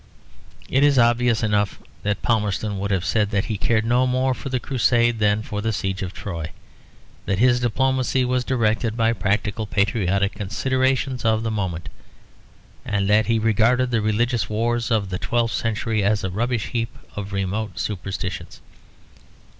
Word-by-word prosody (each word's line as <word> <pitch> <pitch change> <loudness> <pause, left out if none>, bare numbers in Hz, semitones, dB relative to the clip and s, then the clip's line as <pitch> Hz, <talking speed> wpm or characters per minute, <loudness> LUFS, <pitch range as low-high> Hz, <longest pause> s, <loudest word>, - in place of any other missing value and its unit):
It 135 +2 +2
is 145 -2 +4
obvious 120 -1 +3
enough 105 -2 0 0.2
that 105 0 -2
Palmerston 105 -2 0
would 100 +1 -2
have 95 -2 0
said 105 +1 +1
that 100 0 0
he 110 - -2
cared 110 -1 +1
no 125 +2 +3
more 130 +1 +1
for 135 - -6
the 130 -1 0
Crusade 120 -2 +2
than 105 0 +2
for 105 -1 -4
the 110 +1 0
Siege 95 -2 -2
of 95 -2 -3
Troy; 85 -5 -5 0.8
that 95 - +1
his 125 +3 +4
diplomacy 130 +2 +1
was 125 0 0
directed 115 -2 0
by 115 0 +3
practical 105 +1 -1
patriotic 100 -1 +1
considerations 130 +5 0
of 110 -1 +2
the 115 - -1
moment; 95 -6 -3 1.0
and 100 -2 -1
that 105 0 +4
he 115 0 +2
regarded 115 +3 +2
the 115 -2 +1
religious 110 -1 0
wars 115 +2 0
of 105 -5 +1
the 90 - -2
twelfth 115 -3 0
century 110 +1 -1
as 100 +1 +1
a 95 - -2
rubbish 120 +3 -1
heap 115 -1 -3 0.2
of 100 -1 -5
remote 100 0 -2
superstitions. 95 -3 -4
110 Hz, 160 wpm, -22 LUFS, 100-120 Hz, 1.0 s, is